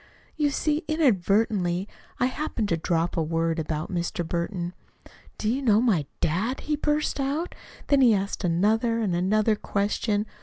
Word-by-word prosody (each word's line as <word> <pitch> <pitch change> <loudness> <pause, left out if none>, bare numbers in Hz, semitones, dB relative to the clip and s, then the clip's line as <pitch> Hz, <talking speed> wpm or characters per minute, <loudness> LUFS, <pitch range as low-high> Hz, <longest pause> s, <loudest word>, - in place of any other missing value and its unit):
You 300 -2 +2
see, 300 +2 0
inadvertently, 200 - +2 0.3
I - - +3
happened 255 -5 -2
to 170 - +2
drop 165 +1 0
a 165 - +1
word 165 +1 0
about 155 +2 -3
Mr. 170 -1 -2
Burton. 175 +1 -3 0.6
'Do 215 - -3
you 250 +5 +1
know 220 -5 +4
my 200 - +2
dad?' 210 - 0
he 300 - -1
burst 300 0 0
out. 285 +6 -1 0.3
Then 280 -1 +3
he 235 -4 +6
asked 200 +1 -3
another 215 +7 +2
and 200 -6 0
another 215 +5 +2
question. 205 +1 -1
210 Hz, 155 wpm, -26 LUFS, 175-255 Hz, 0.6 s, he